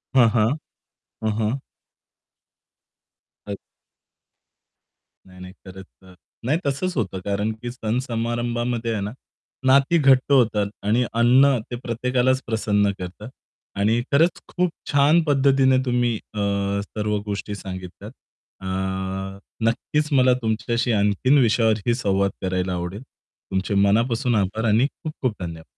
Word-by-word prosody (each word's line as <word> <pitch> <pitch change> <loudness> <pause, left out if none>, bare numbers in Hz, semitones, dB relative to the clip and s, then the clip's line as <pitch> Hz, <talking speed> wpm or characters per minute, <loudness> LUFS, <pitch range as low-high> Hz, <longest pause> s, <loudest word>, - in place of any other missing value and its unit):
हां, 120 -3 +7
हां. 110 -1 +4 0.8
हं, 110 - +1
हं. 110 +5 0 1.9
अ 100 -1 -5 1.7
नाही, 90 -1 -16
नाही, 90 0 -10
खरंच. 95 0 -10 0.2
अ, 95 -1 -16 0.3
नाही 150 +6 +2
तसंच 155 +6 -1
होतं 95 -5 -2
कारण 100 +2 -1
की 120 0 -4
सण-समारंभामध्ये 120 0 -2
आहे 105 - -2
ना, 100 +2 -3 0.5
नाती 140 +5 +4
घट्ट 135 -2 +4
होतात 110 -6 +3 0.2
आणि 115 +4 +2
अन्न 125 +4 +5
ते - - -2
प्रत्येकालाच 125 +2 +1
प्रसन्न 105 -3 +1
करतं. 90 +5 -8 0.5
आणि 110 +4 +2
खरंच 165 +5 +3
खूप 180 0 0 0.2
छान 145 +4 +5
पद्धतीने 135 -3 +3
तुम्ही 120 -2 +1 0.2
अ, 105 - -4 0.4
सर्व 105 0 -2
गोष्टी 100 0 -4
सांगितल्यात. 95 +2 -8 0.5
अ, - - -9 1.0
नक्कीच 150 +6 -1
मला 130 -2 +5
तुमच्याशी 115 +2 -1
आणखीन 105 +6 +3
विषयावरही 115 -2 +2
संवाद 100 -5 +1
करायला 95 -1 -1
आवडेल. 90 +4 -4 0.5
तुमचे 95 +2 -1
मनापासून 115 +5 +2
आभार 105 +3 0
आणि 110 +5 +4 0.2
खूप-खूप 135 -7 -2
धन्यवाद! 85 -2 -6
115 Hz, 120 wpm, -23 LUFS, 100-130 Hz, 1.9 s, हां